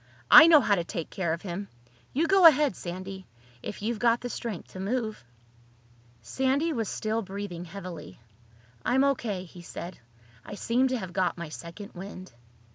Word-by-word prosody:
I 310 +2 +11
know 315 -3 +8
how 210 - +2
to 175 -4 +1
take 170 -1 -5
care 175 -4 -1
of 165 +1 -3
him. 195 +1 -5 0.4
You 310 +5 +1
go 380 0 +7
ahead, 300 -2 +4
Sandy—if 180 - -9
you've 225 0 -2
got 235 0 +3
the 245 - -5
strength 225 -7 -5
to 185 - -10
move." 215 - -2 1.0
Sandy 265 - 0
was 225 -6 -2
still 220 +1 -2
breathing 195 -3 -6
heavily. 175 - -9 0.6
"I'm 265 +2 +3
O.K.," 235 -9 0
he 175 0 -13
said. 175 +1 -8 0.4
"I 205 - -8
seem 245 +5 +1
to 255 0 -1
have 185 -6 -7
got 185 -1 0
my 170 -2 -6
second 170 +6 -9
wind." 185 -1 -9
200 Hz, 165 wpm, -28 LUFS, 175-245 Hz, 1.0 s, I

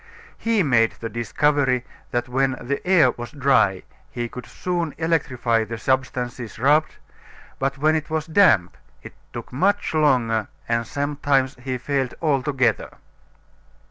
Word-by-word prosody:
He 225 -3 +1
made 115 -6 +3
the 115 - -7
discovery 130 +2 +1 0.2
that 120 0 -2
when 135 +2 +1
the 140 +3 -3
air 165 -9 +5
was 120 0 -8
dry 135 - +2 0.3
he 120 0 -4
could 125 -2 -9
soon 175 -4 -3
electrify 130 -8 0
the 115 +1 -6
substances 125 -1 -2
rubbed, 150 +6 +2 0.6
but 135 0 -1
when 155 +3 +3
it 155 0 -2
was 155 -1 -1
damp 160 - +3 0.3
it - - -10 0.2
took - - -8
much 195 +9 +1
longer 125 -8 +2 0.2
and 115 0 0
sometimes 140 -2 0
he 130 -1 -2
failed 135 0 -2
altogether. 135 -6 0
135 Hz, 135 wpm, -22 LUFS, 120-150 Hz, 0.6 s, air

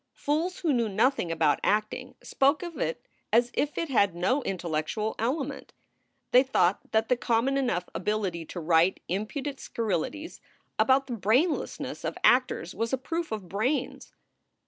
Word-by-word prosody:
Fools 320 +5 -1
who 320 -5 +2
knew 235 -3 +1
nothing 210 -3 +1
about 160 -3 +2
acting 215 +1 -1
spoke 280 +5 +2
of 345 -2 -7
it - - -2 0.3
as 240 +1 +3
if 295 +1 -1
it 335 - -1
had 200 -8 +3
no 190 +11 +1
intellectual 180 - -2
element. 275 +4 -3 0.6
They 250 - +7
thought 205 -8 +2
that 220 0 +2
the 250 - +3
common 245 +2 +1
enough 245 -10 0
ability 185 -2 -2
to 175 - -7
write 165 +2 +3
impudent 265 - -3
scurrilities 230 - -3 0.4
about 270 +1 +4
the 255 - -5
brainlessness 235 - 0
of - - -3
actors 250 -8 +3
was 230 +2 -2
a 265 - +1
proof 330 +4 -4
of 210 -4 -4
brains. 250 - -2
230 Hz, 150 wpm, -28 LUFS, 190-275 Hz, 0.6 s, They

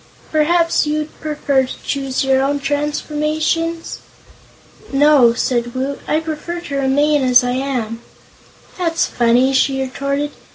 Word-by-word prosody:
Perhaps 330 +1 +2
you'd 305 0 -2
prefer 290 -3 0
to - - -9
choose 270 -2 -2
your 265 0 +2
own 285 +1 0
transformations?" 305 +3 -2 0.9
"No," 275 -4 +5
said 240 0 -1
Woot, 270 +2 -3
"I 310 - +1
prefer 320 +2 -5
to 285 -5 -5
remain 285 +2 +2
as 250 -1 +5
I 245 - -1
am." 250 -4 -3 0.8
"That's 335 -2 +1
funny," 245 +3 +2
she 270 0 +2
retorted. 280 +2 -2
280 Hz, 125 wpm, -18 LUFS, 265-305 Hz, 0.9 s, No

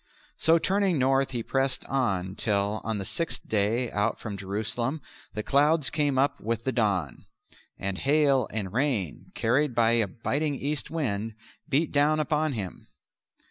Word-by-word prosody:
So 165 +1 +5
turning 190 0 +1
north 135 +1 +2
he 120 -3 -3
pressed 135 0 -1
on 95 -9 -1
till 105 -1 0
on 110 -1 -2
the 100 - -4
sixth 165 - -3
day 110 +4 +1
out 105 +3 0
from 105 -2 -5
Jerusalem 110 - -2 0.4
the 105 - -2
clouds 145 +3 +3
came 145 -3 +1
up 140 +1 +2
with 115 +1 -2
the 130 - 0
dawn, 100 - -1 0.5
and 100 -1 -3
hail 140 -4 +3
and 105 -4 -4
rain, 120 - -1
carried 125 +3 +1
by 115 -1 +4
a 115 -3 +4
biting 140 - -2
east 145 +2 -2
wind, 115 -9 -2 0.3
beat 145 +4 +2
down 150 +2 +3
upon 155 0 0
him. 100 -7 -6
125 Hz, 155 wpm, -27 LUFS, 105-145 Hz, 0.5 s, So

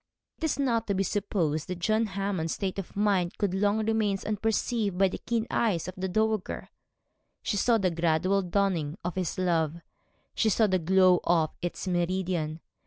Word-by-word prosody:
It - - -10
is 315 - 0
not 235 -5 0
to 200 - 0
be 195 - +1
supposed 175 -6 -1
that 180 -1 -4
John 215 +5 +1
Hammond's 195 -4 -2
state 195 -1 -3
of 195 - -7
mind 195 -4 +1
could 200 -3 0
long 205 +2 +1
remain 215 -3 +1
unperceived 215 -1 0
by 195 0 +4
the - - -6
keen 230 -2 -1
eyes 195 -8 +1
of 185 - -5
the 190 0 -3
dowager. 215 +1 -1 0.7
She - - -1
saw 230 +3 +3
the 190 -4 +1
gradual 170 +4 +1
dawning 180 -4 0
of 180 - -1
his 185 -2 -2
love, 165 -4 +1 0.6
she 220 - +2
saw 220 +2 +3
the 190 -3 +2
glow 185 +1 +4
of 165 -2 +2
its 175 +2 -4
meridian. 175 -3 -1
190 Hz, 175 wpm, -28 LUFS, 175-210 Hz, 0.7 s, by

